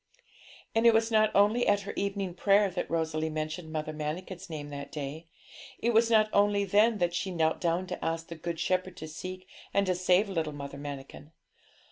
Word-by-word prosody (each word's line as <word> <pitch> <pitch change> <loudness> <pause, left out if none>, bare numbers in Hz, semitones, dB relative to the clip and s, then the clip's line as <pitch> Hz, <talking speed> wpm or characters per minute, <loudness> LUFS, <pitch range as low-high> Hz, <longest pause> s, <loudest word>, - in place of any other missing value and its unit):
And 225 +1 +4
it 230 - +6
was 225 +1 +2
not 215 -1 +4
only 210 +5 +4
at 205 0 +3
her 200 - -6
evening 195 -2 -2
prayer 200 +2 +3
that 180 - -3
Rosalie 160 -1 -1
mentioned 155 +1 -4
Mother 155 0 -3
Manikin's 170 +5 -5
name 150 -2 -6
that 140 0 -7
day; 150 +2 -6 0.5
it 235 +1 0
was 230 +1 +4
not 215 -2 +5
only 205 0 +3
then 210 +4 +4
that 175 -2 0
she 190 +2 -2
knelt 160 -3 0
down 170 +2 +1
to 180 0 -6
ask 165 0 -2
the - - -7
Good 165 0 -5
Shepherd 185 0 -1
to 155 - -7
seek 185 +4 -7 0.3
and 200 0 +4
to 185 - +2
save 180 +3 +3
little 165 -6 -2
Mother 140 -1 -7
Manikin. 145 +1 -8
180 Hz, 195 wpm, -29 LUFS, 155-200 Hz, 0.5 s, it